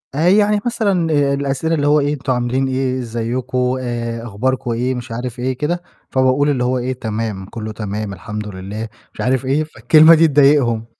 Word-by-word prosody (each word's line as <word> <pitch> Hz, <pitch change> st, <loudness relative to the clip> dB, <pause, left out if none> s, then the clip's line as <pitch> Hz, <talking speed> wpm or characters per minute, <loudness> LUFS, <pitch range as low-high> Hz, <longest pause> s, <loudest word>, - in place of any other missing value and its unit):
آآ، 160 Hz, +4 st, +2 dB
يعني 205 Hz, +2 st, +4 dB
مثلًا 200 Hz, -8 st, 0 dB, 0.2 s
الأسئلة 140 Hz, +3 st, -1 dB
اللي 145 Hz, -2 st, 0 dB
هو 150 Hz, +1 st, +4 dB
إيه 145 Hz, +1 st, 0 dB
أنتم 135 Hz, -2 st, -2 dB
عاملين 125 Hz, +2 st, 0 dB
إيه، 130 Hz, 0 st, -1 dB
ازيكم، 125 Hz, +2 st, -2 dB
آآ 115 Hz, -1 st, -4 dB
أخباركم 120 Hz, +3 st, -2 dB
إيه؟ 125 Hz, +3 st, -1 dB
مش 120 Hz, 0 st, -7 dB
عارف 120 Hz, +1 st, -5 dB
إيه 130 Hz, +1 st, -1 dB
كده، 170 Hz, +5 st, -1 dB, 0.3 s
فباقول 130 Hz, +2 st, +2 dB
اللي 130 Hz, -4 st, 0 dB
هو 125 Hz, +1 st, +1 dB
إيه 125 Hz, +1 st, -2 dB
تمام، 110 Hz, -4 st, -4 dB
كُلّه 110 Hz, +2 st, -6 dB
تمام، 105 Hz, -1 st, -4 dB
الحمد 105 Hz, +3 st, -6 dB
لله، 100 Hz, +3 st, -6 dB, 0.3 s
مش -, -, -7 dB
عارف 130 Hz, +1 st, 0 dB
إيه. 140 Hz, +4 st, +1 dB
فالكلمة 155 Hz, +1 st, +5 dB
دي 165 Hz, +1 st, +5 dB
تضايقهم. 135 Hz, -6 st, +3 dB
130 Hz, 180 wpm, -18 LUFS, 115-145 Hz, 0.3 s, فالكلمة